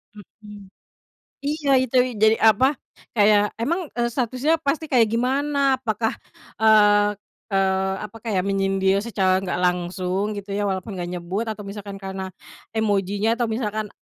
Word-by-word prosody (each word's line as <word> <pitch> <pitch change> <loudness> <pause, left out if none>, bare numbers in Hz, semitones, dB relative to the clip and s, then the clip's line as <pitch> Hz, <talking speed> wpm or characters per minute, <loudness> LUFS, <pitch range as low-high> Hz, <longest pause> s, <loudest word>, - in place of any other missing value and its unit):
Mhm. 205 -1 -13 0.8
Iya, 295 -1 -1
itu. 260 0 -2 0.3
Jadi, 220 +1 +6
apa, 220 +5 +4 0.5
kayak 205 -1 +5 0.2
emang, 340 +9 0 0.2
eee, 240 0 +1
statusnya 255 +5 +1
pasti 315 +3 0
kayak, 235 -3 +5
gimana, 275 +5 0 0.2
apakah, 225 -1 -1 0.5
eee 205 -1 +5 0.3
eee, 190 -1 +1
apa 210 +2 -8
kayak 195 -5 0
menyindir 195 0 +1
secara 190 -4 +2
nggak 185 -1 -2
langsung, 180 +3 -1
gitu 200 0 -8
ya, 205 +1 -1
walaupun 190 +1 -3
nggak 175 0 -4
nyebut, 180 +5 -3
atau 215 -1 -5
misalkan 200 0 -8
karena 190 0 -5 0.5
emojinya 205 -1 0
atau 240 - +1
misalkan, 215 -2 -2
205 Hz, 135 wpm, -23 LUFS, 195-230 Hz, 0.8 s, Jadi